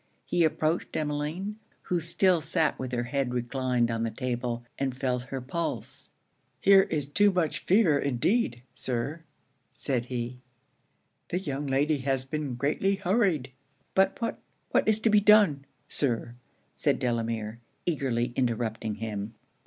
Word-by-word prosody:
He 175 - +2
approached 160 +1 0
Emmeline, 155 +7 -2 0.3
who 180 - 0
still 170 +1 +3
sat 160 0 +1
with 130 -1 -4
her 120 -1 0
head 130 0 -1
reclined 125 -1 0
on 115 0 -1
the 115 - 0
table, 120 0 -3
and 135 -2 -1
felt 125 -2 -1
her 135 - -3
pulse. 165 +6 -4 0.5
'Here 195 -1 +7
is 150 -3 0
too 205 +8 +4
much 160 -4 0
fever 180 -7 +4
indeed, 130 - 0
Sir,' 130 +5 -3 0.5
said 125 -4 -1
he; 125 0 -4 0.9
'the 180 - -1
young 145 -4 -3
lady 145 +2 +2
has 135 0 0
been 145 -2 -3
greatly 150 +10 +1
hurried.' 185 - +1 0.4
'But 190 0 +3
what 230 -1 -2 0.3
what - - +3
is 220 0 +4
to 225 - +3
be 210 - +7
done, 205 -9 +5 0.2
Sir?' 120 -4 -1 0.4
said - - +1
Delamere, 115 -2 -2 0.3
eagerly 125 -7 0
interrupting 115 -3 -1
him. 105 0 -5
140 Hz, 140 wpm, -28 LUFS, 120-170 Hz, 0.9 s, Here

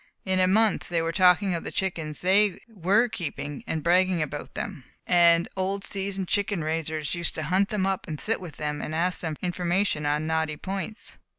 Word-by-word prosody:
In 190 -1 +1
a 185 - +4
month 215 +2 +2
they 170 -1 +1
were 165 - 0
talking 185 +2 +4
of 170 - -3
the - - -4
chickens 165 -5 -3
they 195 +1 +4
were 210 +2 +2
keeping, 145 - -5
and 160 -2 -2
bragging 180 +1 +3
about 145 -1 -4
them; 180 -10 -5 0.2
and 170 -1 +5
old 195 +1 -2
seasoned 195 -1 -3
chicken 200 -4 0
raisers 155 -1 -2
used 170 -2 -1
to 160 - -3
hunt 185 +6 +2
them 205 -3 0
up 195 -1 -1
and 155 -2 -5
sit 225 -2 -1
with 165 -6 -9
them 150 -1 -3
and 155 - -4
ask 180 +3 0
for 160 -3 -2
information 175 -3 0
on 150 +1 0
knotty 160 -1 -1
points. 195 +4 -5
180 Hz, 195 wpm, -26 LUFS, 160-195 Hz, 0.2 s, and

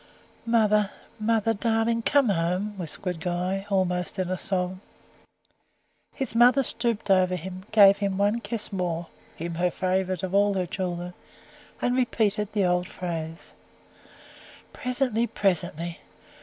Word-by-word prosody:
"Mother! 210 -3 +3 0.3
mother 225 0 +2
darling! 225 +1 +1
come 280 0 +3
home," 185 +3 0
whispered 180 +1 -4
Guy, 180 +3 -2
almost 180 -2 0
in 185 -1 -1
a 185 - -1
sob. 185 -1 -2 1.4
His 270 - -2
mother 245 +3 +5
stooped 235 -4 -1
over 185 -1 +4
him, 185 +2 -7
gave 200 -2 +7
him 200 -2 -1
one 205 +3 +2
kiss 230 -3 -4
more 175 -3 -2 0.3
him 170 +1 -5
her 175 +2 +1
favourite 185 0 -1
of 190 0 -3
all 200 0 +3
her 185 -1 0
children 175 -1 -4 0.7
and 245 - +2
repeated 215 -5 +1
the 205 -3 +2
old 180 0 +1
phrase: 165 -3 -6 1.2
"Presently, 250 -2 0
presently! 170 -4 -1
195 Hz, 130 wpm, -26 LUFS, 180-220 Hz, 1.4 s, gave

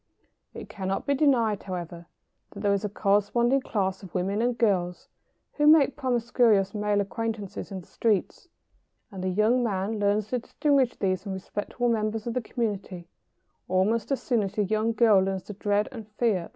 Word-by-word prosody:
] - - -51
It - - -9
cannot 190 -1 -3
be 280 - +2
denied, 245 -8 +2
however, 175 -2 -7 0.4
that 200 - -10
there 205 -1 +2
is 200 - -1
a 210 - -1
corresponding 210 +6 +2
class 190 -5 -2
of 190 -4 -12
women 195 +4 0
and 240 0 0
girls 180 -6 0 0.4
who 295 -1 +2
make 300 -3 +6
promiscuous 240 -6 +2
male 210 -1 +1
acquaintances 215 -1 -4
in 190 -1 -5
the - - -18
streets, 225 - -1 0.6
and 190 -2 -7
the 185 - 0
young 215 +6 +2
man 205 0 -1
learns 205 +1 +1
to 250 - 0
distinguish 275 0 +1
these 185 -2 -1
from 195 -1 -5
respectable 205 +5 -3
members 215 -1 -1
of 235 - -3
the 250 - -1
community 200 -7 -4 0.6
almost 210 +6 +1
as 275 - -1
soon 240 -4 +1
as 195 -1 -3
the 210 - +2
young 215 +3 0
girl 220 -3 +5
learns 190 -1 -1
to 210 - -8
dread 205 +1 0
and 225 -5 -9
fear - - -31
the 210 - -42
prowling 230 -4 +2
man. - - -14
210 Hz, 190 wpm, -26 LUFS, 195-235 Hz, 0.6 s, make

